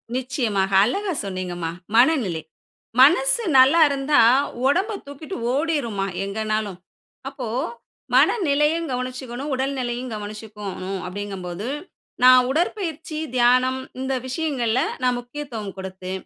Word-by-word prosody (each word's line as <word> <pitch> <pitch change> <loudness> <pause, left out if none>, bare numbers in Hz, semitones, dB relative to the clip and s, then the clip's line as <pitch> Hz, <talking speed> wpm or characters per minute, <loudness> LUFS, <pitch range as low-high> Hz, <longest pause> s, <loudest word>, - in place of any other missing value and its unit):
நிச்சயமாக. 240 -7 -1
அழகா 385 - -1
சொன்னீங்கம்மா. 180 -3 -4 0.2
"மனநிலை." 235 - +3 0.6
மனசு 270 - +5
நல்லா 265 +6 +7
இருந்தா, 280 +1 +2 0.5
உடம்பை 385 +9 +1
தூக்கிட்டு 285 +6 -8 0.2
ஓடிரும்மா 275 -10 -1 0.2
எங்கன்னாலும். 215 -1 -2 0.5
அப்போ 270 -3 -6 0.7
மனநிலையும் 320 -4 +3
கவனிச்சுக்கணும், 255 +2 -4
உடல் 265 +2 -1
நிலையும் 245 0 -3
கவனிச்சுக்கோணும் 205 -2 -6
அப்படிங்கும்போது, 190 0 -5 0.6
நான் 255 0 +8
உடற்பயிற்சி, 325 0 -2 0.2
தியானம் 255 +1 +3 0.2
இந்த 265 +1 -2
விஷயங்கள்ல 260 -4 0 0.2
நான் 250 -1 +2
முக்கியத்துவம் 245 -5 -7
குடுத்து, 190 -1 -7
255 Hz, 95 wpm, -23 LUFS, 205-285 Hz, 0.7 s, நான்